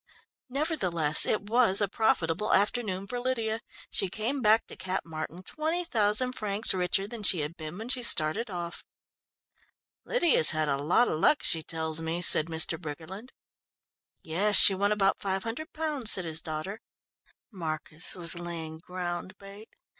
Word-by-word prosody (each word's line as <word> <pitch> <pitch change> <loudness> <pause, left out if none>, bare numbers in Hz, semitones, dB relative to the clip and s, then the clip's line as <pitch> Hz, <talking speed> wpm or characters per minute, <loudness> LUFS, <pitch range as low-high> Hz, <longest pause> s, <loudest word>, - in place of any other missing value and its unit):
Nevertheless, 185 - +3
it 215 - -1
was 225 -4 +3
a 205 - +1
profitable 200 -2 -1
afternoon 200 -2 -2
for 245 +4 -7
Lydia. 230 -3 -3 0.3
She 195 - -1
came 230 +8 -4
back 220 0 +2
to - - -12
Cap 185 0 -5
Martin 165 +2 -9
twenty 320 - -4
thousand 225 0 +2
francs 210 -2 +4
richer 185 +1 -1
than 225 +2 -10
she 185 -5 +3
had 150 +3 -6
been 155 +1 -10
when 220 +2 -9
she 255 0 0
started 215 +1 +3
off. 175 -2 -8 1.2
"Lydia's 345 - +3
had 155 -1 -1
a 140 -1 -1
lot 180 +11 +1
of 155 - -4
luck 300 - +1
she 165 - +1
tells 160 0 -2
me," 165 +1 -4
said 165 -2 +5
Mr. 160 0 0
Briggerland. 170 - -10 0.9
"Yes. 200 +6 0
She 195 - +10
won 200 +2 -2
about 195 -2 0
five 195 -1 -3
hundred 260 +9 -7
pounds," 300 -8 0
said 185 - -1
his 160 0 0
daughter. 160 +8 -7 0.7
"Marcus 160 -3 -5
was 170 -1 +1
laying 165 -2 -8
ground 180 +2 -7
bait. 200 +3 -14
190 Hz, 160 wpm, -26 LUFS, 165-225 Hz, 1.2 s, She